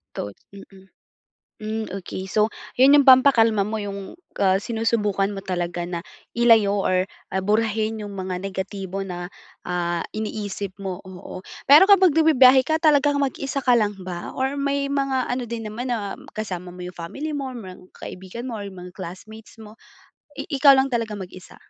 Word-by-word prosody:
Thought, 100 -1 -6 0.2
mm. 195 -1 -14 0.7
Hmm, 220 +1 -3
okey. 190 0 -6
So, 210 +3 +1 0.2
yun 270 +3 +6
yung 285 - +5
pampakalma 230 -6 +5
mo 220 - -2
yung, 200 - -6 0.2
ah, 190 -1 +4
sinusubukan 210 -2 0
mo 195 -1 -7
talaga 175 -1 -3
na 175 -1 -4 0.3
ilayo 220 -4 +4
or, 185 -1 +1 0.2
ah, 190 0 -2
burahin 220 +1 0
yung 205 -1 -7
mga 185 -1 -4
negatibo 195 0 -5
na, 175 -1 -6 0.4
ah, 175 -1 -1 0.2
iniisip 205 -3 -4
mo, 190 0 -5
oo. 185 0 -10 0.2
Pero 295 +6 +9
kapag 380 -5 +5
nagbibiyahe 265 -5 +6
ka 315 +3 0
talagang 290 -2 +3
mag-isa 275 0 -2
ka 250 -2 +4
lang 210 -3 +1
ba 180 -2 -6
or 265 +2 -2
may 280 0 -1
mga 275 -2 0
ano 250 0 -2
din 225 -2 -5
naman 245 +4 -4
na 205 -4 -3 0.2
kasama 180 -4 -5
mo 180 - -12
yung 180 0 -8
family 285 - -5
mo, 270 -2 -4
merong 190 -7 -10
mga - - -9
kaibigan 190 +7 -8
mo, 230 - -4
or 205 - -6
mga 180 -1 -11
classmates 215 +5 -10
mo? 215 0 -12 0.6
I - - -5
ikaw 275 0 +6
lang 265 0 +2
talagang 220 -4 -2
mag-isa? 185 0 -13
215 Hz, 170 wpm, -23 LUFS, 190-260 Hz, 0.7 s, Pero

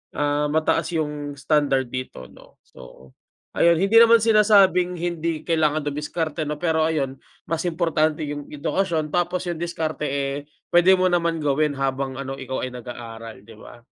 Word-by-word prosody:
ah, 145 0 0
mataas 160 +1 +1
'yong 150 -2 -3
standard 140 -2 +1
dito, 130 - -6
'no. - - -19
So, 65 +2 -16 0.4
ayon. 170 0 +4
Hindi 205 +4 +5
naman 230 -1 +6
sinasabing 200 -5 +4
hindi 165 -2 -3
kailangan 155 -2 +1
dumiskarte 150 +2 -3
'no, 150 - -2
pero 160 -2 +1
ayun, 135 -4 -2 0.3
mas 165 -1 -2
importante 160 -2 0
'yong 145 -1 -5
edukasyon 155 0 -2
tapos 175 +1 -1
'yong 170 -2 -3
diskarte, 160 -3 -3
eh, 140 0 -2 0.4
puwede 175 +2 +6
mo 185 -1 +1
naman 170 -2 0
gawin 145 +1 +1
habang 135 -1 -2
ano, 135 0 -6
ikaw 130 0 -4
ay 130 - -4
nag-aaral, 115 -3 -9
'di 110 0 -15
ba? 120 -1 -14
155 Hz, 155 wpm, -23 LUFS, 140-170 Hz, 0.4 s, naman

